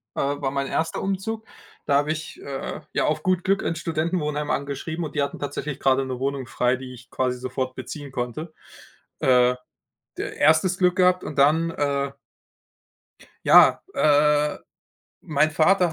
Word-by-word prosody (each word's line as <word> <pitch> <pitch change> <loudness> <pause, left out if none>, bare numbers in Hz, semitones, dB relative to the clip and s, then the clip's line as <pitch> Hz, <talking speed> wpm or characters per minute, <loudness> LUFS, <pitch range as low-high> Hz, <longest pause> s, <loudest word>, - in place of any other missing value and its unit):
äh, - - -3
war 140 -1 -1
mein 140 0 -2
1. 160 +3 -1
Umzug, 215 +3 -3 0.4
da 140 - +3
habe 145 +2 +2
ich, 160 0 -6
äh, 135 -1 -5
ja - - +1
auf 155 0 -1
gut 185 -1 +1
Glück 195 0 +1
'n 170 - -1
Studentenwohnheim 155 -2 -2
angeschrieben 140 +4 -3
und 155 -1 -6
die 145 - +2
hatten 140 - -4
tatsächlich 145 0 -4
gerade 135 0 +2
'ne 130 -1 -5
Wohnung 135 0 -2
frei, 125 +1 +1
die 130 0 -9
ich 125 0 -14
quasi 125 -1 -1
sofort 130 +1 -3
beziehen 140 +2 -7
konnte. 130 +6 -4 0.7
Äh, 125 -1 +4 0.6
d - - -2
1. 160 +5 +3
Glück 180 -1 +3
gehabt 180 0 +3
und 145 - -7
dann 155 +4 +4
äh. 140 -3 -1 1.3
Ja, - - +7
äh, 150 0 +3 0.6
mein 155 0 +1
Vater 175 +2 +3
150 Hz, 160 wpm, -24 LUFS, 135-165 Hz, 1.3 s, Ja